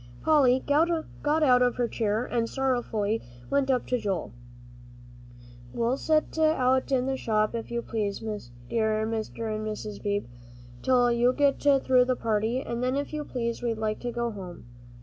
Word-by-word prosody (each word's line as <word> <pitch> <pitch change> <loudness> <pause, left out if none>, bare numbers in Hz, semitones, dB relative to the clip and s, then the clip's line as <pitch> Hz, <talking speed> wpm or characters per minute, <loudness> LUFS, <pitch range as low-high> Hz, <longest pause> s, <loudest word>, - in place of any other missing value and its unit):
Polly 265 -5 +4
got 315 0 +1
out 250 -3 +5
of 245 -1 +3
her 245 -1 0
chair 220 0 -1
and 230 -2 -1
sorrowfully 240 -5 -1 0.3
went 280 -1 +2
up 255 -2 +1
to 250 - 0
Joel. 195 - -3 1.4
"We'll 235 +2 +1
sit 310 +2 0
out 265 -5 +2
in 255 -2 +2
the 270 0 0
shop, 215 -3 0
if 230 -1 -4
you 235 0 -3
please, 210 -3 -2
dear 215 - -2
Mr. 220 0 -3
and 215 - -4
Mrs. 215 -1 -5
Beebe, 205 -1 -1 0.6
till 245 -2 +3
you 240 +1 +3
get 285 0 +2
through 265 -3 +4
the 255 0 +1
party. 225 +3 0
And 235 0 -4
then, 255 +1 0
if 285 +2 -3
you 305 -1 -2
please, 235 -4 -3
we'd 235 -2 -1
like 215 -1 -2
to 245 - -4
go 235 0 -2
home." 185 - -9
240 Hz, 170 wpm, -27 LUFS, 220-260 Hz, 1.4 s, out